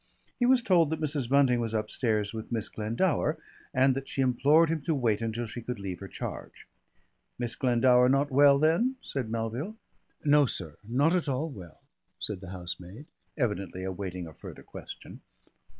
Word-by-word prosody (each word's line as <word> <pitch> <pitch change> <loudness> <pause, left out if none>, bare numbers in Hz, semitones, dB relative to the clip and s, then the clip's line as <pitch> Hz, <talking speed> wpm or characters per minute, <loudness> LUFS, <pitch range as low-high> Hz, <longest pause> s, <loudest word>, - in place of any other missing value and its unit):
He 245 - +3
was 255 -1 +4
told 175 - +4
that 160 0 -2
Mrs. 145 -5 -2
Bunting 135 -3 +4
was 115 -1 -2
upstairs 105 -1 0
with 110 +1 -7
Miss 110 -2 -2
Glendower 145 - 0 0.3
and 130 +1 +4
that 135 +1 -5
she 135 - 0
implored 145 +6 +4
him 160 -2 -1
to 155 +2 0
wait 115 -5 +1
until 115 +1 -2
she 120 +2 -7
could 125 +1 -4
leave 95 -2 -5
her 100 - -7
charge. - - -7 0.7
"Miss 120 -1 -3
Glendower 125 0 +4
not 140 +2 +2
well, 140 +1 +6
then?" 170 - +2
said 130 -5 -4
Melville. 115 - -3 0.5
"No, 145 -1 +5
sir, 80 -9 -6
not 140 - +2
at 170 -5 0
all 140 +5 -1
well," 90 - -12 0.4
said 100 -3 -4
the 95 - -9
housemaid, 90 - -7 0.3
evidently 100 - -2
awaiting 95 -1 -4
a 80 - -10
further - - -11
question. - - -10
125 Hz, 170 wpm, -29 LUFS, 105-145 Hz, 0.7 s, well